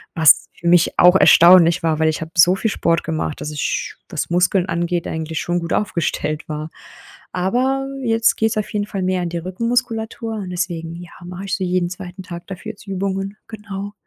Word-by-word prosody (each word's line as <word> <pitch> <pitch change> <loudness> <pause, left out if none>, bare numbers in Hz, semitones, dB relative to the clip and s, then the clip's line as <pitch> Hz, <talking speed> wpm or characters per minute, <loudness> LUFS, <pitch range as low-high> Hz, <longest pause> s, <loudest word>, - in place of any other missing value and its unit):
Was 160 -3 +5
für 170 - -6
mich 175 -1 +3
auch 180 +1 +7
erstaunlich 175 -1 +7
war, 160 -2 +1
weil 160 0 +3
ich 155 - -2
habe 160 0 -6
so 175 +2 +6
viel 220 +3 -1
Sport 170 -3 0
gemacht, 155 -2 -3
dass 150 - -4
ich, 150 -2 -3
was - - -3
Muskeln 180 +1 +2
angeht, 170 0 -1
eigentlich 160 0 -4
schon 175 0 -1
gut 170 - -6
aufgestellt 165 -5 -2
war. 155 0 -5 0.6
Aber 255 +9 0 0.2
jetzt 225 -1 +2
geht's 220 0 0
auf 215 - -2
jeden 205 -1 -1
Fall 195 -2 -4
mehr 185 0 0
an 175 - -2
die 170 - -4
Rückenmuskulatur 225 +4 -2
und 200 -4 -5
deswegen, 170 -2 -3
ja, 175 0 -10
mache 180 +2 -7
ich 190 - -1
so 190 - -3
jeden 180 -1 0
2. 180 +1 -8
Tag 170 -1 -9
dafür 195 +3 -7
jetzt 205 - -18
Übungen, 195 +1 -3
genau. 205 -2 -7
180 Hz, 195 wpm, -20 LUFS, 170-200 Hz, 0.6 s, auch